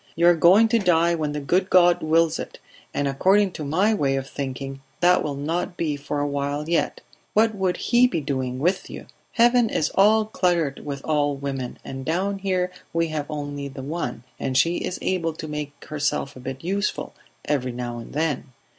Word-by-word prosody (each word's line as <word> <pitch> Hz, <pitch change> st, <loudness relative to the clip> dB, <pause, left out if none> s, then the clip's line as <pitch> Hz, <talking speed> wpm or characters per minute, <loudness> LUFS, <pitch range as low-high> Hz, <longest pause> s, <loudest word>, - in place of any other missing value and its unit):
"You 170 Hz, -, +2 dB
are 175 Hz, -, +7 dB
going 185 Hz, +7 st, +6 dB
to 230 Hz, 0 st, +3 dB
die 170 Hz, -3 st, +3 dB
when 155 Hz, -3 st, -1 dB
the 150 Hz, -, -2 dB
good 180 Hz, +7 st, +1 dB
God 175 Hz, -1 st, +5 dB
wills 165 Hz, +1 st, +2 dB
it, -, -, -7 dB, 0.3 s
and 145 Hz, -, -1 dB
according 190 Hz, +8 st, +3 dB
to 155 Hz, -, -6 dB
my 185 Hz, +10 st, +2 dB
way 140 Hz, -9 st, +1 dB
of 135 Hz, 0 st, -3 dB
thinking 135 Hz, 0 st, -5 dB, 0.2 s
that 180 Hz, +1 st, +4 dB
will 145 Hz, -2 st, -3 dB
not 165 Hz, +5 st, -3 dB
be 155 Hz, -3 st, -1 dB
for 145 Hz, +1 st, -4 dB
a 145 Hz, -, 0 dB
while 145 Hz, +1 st, -2 dB
yet. 170 Hz, 0 st, 0 dB, 0.3 s
What 220 Hz, +1 st, +4 dB
would 190 Hz, -3 st, 0 dB
He 245 Hz, +1 st, +4 dB
be 245 Hz, -, -2 dB
doing 130 Hz, -3 st, -2 dB
with 180 Hz, +8 st, 0 dB
you? -, -, -8 dB, 0.3 s
Heaven 240 Hz, -1 st, +4 dB
is 155 Hz, -, 0 dB
all 215 Hz, +2 st, +5 dB
cluttered 175 Hz, -8 st, 0 dB
with 140 Hz, -2 st, -5 dB
old 145 Hz, -2 st, 0 dB
women, 135 Hz, -3 st, -4 dB
and 135 Hz, 0 st, -6 dB
down 190 Hz, +6 st, -1 dB
here 185 Hz, -2 st, 0 dB, 0.2 s
we 165 Hz, 0 st, +1 dB
have 150 Hz, -1 st, -4 dB
only 145 Hz, -2 st, -4 dB
the 135 Hz, -1 st, -8 dB
one, 135 Hz, -5 st, -4 dB, 0.2 s
and 130 Hz, -1 st, -1 dB
she 170 Hz, +5 st, +3 dB
is 180 Hz, -, -3 dB
able 170 Hz, -3 st, 0 dB
to 155 Hz, 0 st, -7 dB
make 150 Hz, -1 st, -6 dB
herself 145 Hz, -2 st, -2 dB
a -, -, -10 dB
bit 130 Hz, +2 st, -7 dB
useful, 200 Hz, +4 st, -2 dB, 0.3 s
every 130 Hz, -4 st, 0 dB
now 120 Hz, -1 st, -5 dB
and 115 Hz, -, -10 dB
then 150 Hz, -3 st, -2 dB
155 Hz, 200 wpm, -24 LUFS, 140-180 Hz, 0.3 s, are